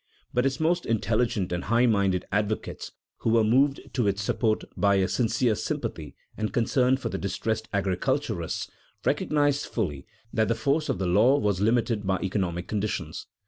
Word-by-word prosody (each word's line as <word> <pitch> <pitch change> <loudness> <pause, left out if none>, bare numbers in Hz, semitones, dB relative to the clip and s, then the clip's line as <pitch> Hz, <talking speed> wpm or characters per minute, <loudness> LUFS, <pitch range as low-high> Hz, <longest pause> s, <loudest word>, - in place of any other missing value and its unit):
But 125 +2 +2
its 135 - -2
most 175 +2 +1
intelligent 110 -3 0
and 90 0 -2
high 120 +3 +3
minded 100 -5 +2
advocates 105 +2 -2 0.3
(who - - -1
were 115 0 +4
moved 135 +6 +3
to 120 -4 +1
its 100 0 0
support 110 +1 0
by 100 -1 +3
a 95 -1 +2
sincere 120 +1 +1
sympathy - - -4 0.2
and 110 0 -2
concern 125 +2 +2
for 135 - -4
the - - -4
distressed 110 +3 -2
agriculturalists) 95 -3 -1 0.3
recognized 145 -1 +1
fully 75 - -3 0.3
that 110 -1 +2
the 115 - +1
force 140 +7 0
of - - 0
the 95 - -2
law 105 +10 +4
was 100 -6 0
limited 115 -2 +1
by 95 0 +2
economic 90 -2 -2
conditions. 105 0 -3
110 Hz, 165 wpm, -26 LUFS, 100-125 Hz, 0.3 s, were